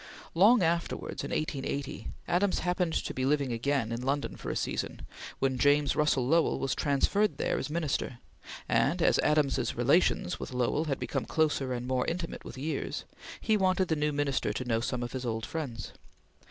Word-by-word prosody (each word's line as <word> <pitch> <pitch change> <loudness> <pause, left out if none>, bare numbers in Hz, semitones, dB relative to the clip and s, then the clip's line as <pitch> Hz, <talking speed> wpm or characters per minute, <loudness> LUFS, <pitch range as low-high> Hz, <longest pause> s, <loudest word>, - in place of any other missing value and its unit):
Long 205 +5 +6
afterwards, 170 +1 -1
in - - -4
1880, 140 -2 -3 0.2
Adams 185 +2 +2
happened 180 -2 0
to - - -2
be 130 - -2
living 140 -2 +1
again 115 -1 0
in 115 +1 -3
London 140 +3 -1
for - - -6
a - - -2
season, - - -3 0.3
when 130 -1 0
James 145 +1 +4
Russell 150 -4 +2
Lowell 165 +3 +3
was 135 -1 -1
transferred 190 +9 +1
there - - 0
as - - -4
Minister; 150 -6 -1 0.5
and 160 +7 +2
as - - +4
Adams's 150 -2 +2
relations - - +2
with - - -6
Lowell 125 +5 +1
had 140 -4 -1
become - - -2
closer 150 -4 +1
and 125 -1 -3
more 130 -1 0
intimate 170 0 -3
with - - -9
years, 150 +4 -3 0.3
he 220 - +2
wanted 185 -2 +2
the 160 - +2
new 150 0 0
Minister 145 -2 0
to 130 - -4
know 115 -2 +1
some 120 +1 -2
of 120 - -5
his 130 -1 -4
old 115 -2 -2
friends. 135 -9 -5
145 Hz, 180 wpm, -30 LUFS, 130-165 Hz, 0.5 s, Long